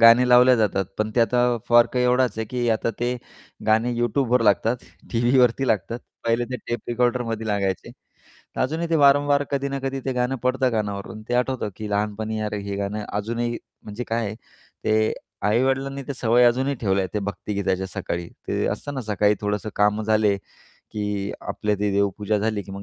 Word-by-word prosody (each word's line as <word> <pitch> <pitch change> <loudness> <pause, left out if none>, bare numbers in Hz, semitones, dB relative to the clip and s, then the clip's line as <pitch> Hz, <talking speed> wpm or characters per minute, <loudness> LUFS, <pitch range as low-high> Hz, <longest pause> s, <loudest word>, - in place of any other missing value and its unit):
गाणे 115 +2 +7
लावल्या 125 +1 +7
जातात. 100 -3 +1
पण 110 0 0
ते - - +5
आता 120 +1 +3 0.3
फरक 120 +1 +5
एवढाच 125 0 +3
आहे, 110 - -1
की 120 0 -1
आता 110 +1 +1
ते 125 +1 0 0.5
गाणे 110 +3 +3
YouTubeवर 120 +1 +2
लागतात, 110 +3 +3 0.4
टीव्हीवरती 125 +2 +3
लागतात. 115 +2 0 0.3
पहिले 115 +1 +1
ते 125 - -2
टेप 120 -2 -2
रेकॉर्डरमध्ये 120 -2 0
लागायचे. 100 -3 -1 0.7
अजूनही 160 +6 -1
ते 165 - +2
वारंवार 145 0 +4
कधी 140 0 0
ना 140 0 -3
कधी 135 0 -2
ते 130 - 0
गाणं 125 +1 0
पडतं 130 0 +2
कानावरून 105 0 -3
ते - - 0
आठवतं, 125 -3 0
की 110 -1 -6
लहानपणी 105 +1 -2
अरे, 105 -1 -2
हे 100 0 -4
गाणं 100 +1 -3
अजूनही 115 +3 -2 0.3
म्हणजे 105 +3 -6
काय 115 0 0
आहे 105 +1 -4 0.5
ते 110 0 +2 0.3
आई-वडिलांनी 135 +4 +1
त्या 140 - -5
सवय 120 0 +3
अजूनही 130 +4 +2
ठेवल्या 95 -5 0
आहे, 95 - -6
ते 105 - 0
भक्तिगीताच्या 95 -1 -2
सकाळी. 85 -1 -4 0.2
ते - - 0
असतं 145 - -4
ना, 130 - -3
सकाळी 105 -1 +2
थोडंसं 105 +1 -2
कामं 105 +1 +2
झाले, 110 -2 +3 0.4
की 105 -1 -4
आपली 105 -1 -1
ती 105 0 0
देवपूजा 100 +1 +1
झाली, 105 -1 -1
की 95 - -10
मग 100 0 -7
115 Hz, 175 wpm, -23 LUFS, 105-125 Hz, 0.7 s, गाणे